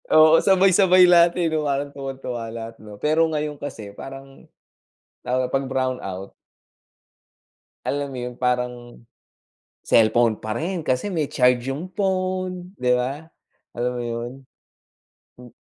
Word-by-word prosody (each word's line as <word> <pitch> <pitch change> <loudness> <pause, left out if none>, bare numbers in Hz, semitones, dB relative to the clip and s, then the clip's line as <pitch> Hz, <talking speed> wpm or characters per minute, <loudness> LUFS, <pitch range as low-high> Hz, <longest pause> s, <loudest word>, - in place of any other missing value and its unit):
oo, 155 +1 +8
sabay-sabay 190 -1 +5
lahat, 170 -1 +6
eh, 175 - +1
'no, 155 -1 0
parang 140 0 -1
tuwang-tuwa 130 -4 -5
lahat 115 0 -7
'no? 105 -1 -11
Pero 155 +2 +3
ngayon 150 -1 -3
kasi 110 -8 -7
parang 135 +4 -11 0.8
lalo 125 +1 +1
na - - -11
'pag 135 0 0
brown 130 -1 -1
out 95 0 -6 1.5
alam 145 0 -2
mo 135 - -7
yun 125 0 -5
parang 125 -1 -2 0.8
cellphone 115 0 +3
pa 110 +1 -4
rin 175 +6 -2
kasi 155 +6 -1
may 155 -5 -1
charge 125 0 +2
yung 155 +8 -5
phone, 185 -2 -2
'di 125 0 +2
ba? 135 +6 -3 0.5
Alam 120 +1 -1
mo 120 -1 -4
yun? 120 +1 -4 1.1
Hmm. 125 -1 -13
135 Hz, 140 wpm, -23 LUFS, 120-165 Hz, 1.5 s, oo